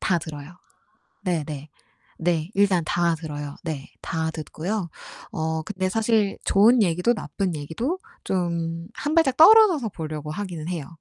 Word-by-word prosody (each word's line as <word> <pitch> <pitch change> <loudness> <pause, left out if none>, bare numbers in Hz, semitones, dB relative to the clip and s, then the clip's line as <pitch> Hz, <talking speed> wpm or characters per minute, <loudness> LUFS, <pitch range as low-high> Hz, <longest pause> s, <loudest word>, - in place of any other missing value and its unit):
다 175 - +2
들어요. 155 +1 -9 0.7
네. 175 -6 0
네. 150 -1 -7 0.5
네. 165 0 0
일단 195 -3 +3
다 170 +1 +1
들어요. 150 -3 -6
네. 155 -5 -5
다 160 -1 -2
듣고요. 170 +5 -4 0.4
어 160 -3 -2
근데 185 +1 -2
사실 215 0 +1
좋은 225 +4 +5
얘기도 180 +5 +2
나쁜 195 -4 -3
얘기도 165 - -3 0.3
좀 170 -3 -1 0.2
1 295 +2 -2
발짝 320 -6 +3
떨어져서 340 - +7
보려고 155 -3 -5
하기는 175 -4 -5
해요. 170 -6 -3
175 Hz, 260 characters per minute, -24 LUFS, 160-210 Hz, 0.7 s, 떨어져서